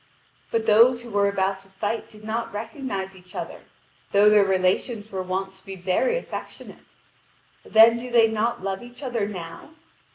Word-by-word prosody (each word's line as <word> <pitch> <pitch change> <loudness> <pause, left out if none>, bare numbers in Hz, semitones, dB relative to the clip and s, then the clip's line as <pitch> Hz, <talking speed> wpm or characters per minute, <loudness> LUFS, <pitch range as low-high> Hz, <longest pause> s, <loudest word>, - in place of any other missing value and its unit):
But 225 -1 -1
those 235 +3 +5
who 235 - -10
were 200 0 +2
about 195 -1 0
to 195 - -18
fight 205 +4 -4
did 215 -1 -16
not 225 +2 -3
recognise 205 -3 -5
each 180 0 -17
other, - - -6 0.5
though 205 +1 +6
their 210 -1 +6
relations 195 +4 0
were 190 -1 -3
wont 190 +1 -3
to 190 0 -17
be 195 -1 -8
very 190 - +1
affectionate. - - -9 0.7
Then 225 +1 +6
do 250 +1 -6
they 235 -2 +5
not 220 -1 -1
love 195 0 -3
each 245 +3 -12
other 235 -6 -1
now? 175 - -9
210 Hz, 170 wpm, -24 LUFS, 190-230 Hz, 0.7 s, though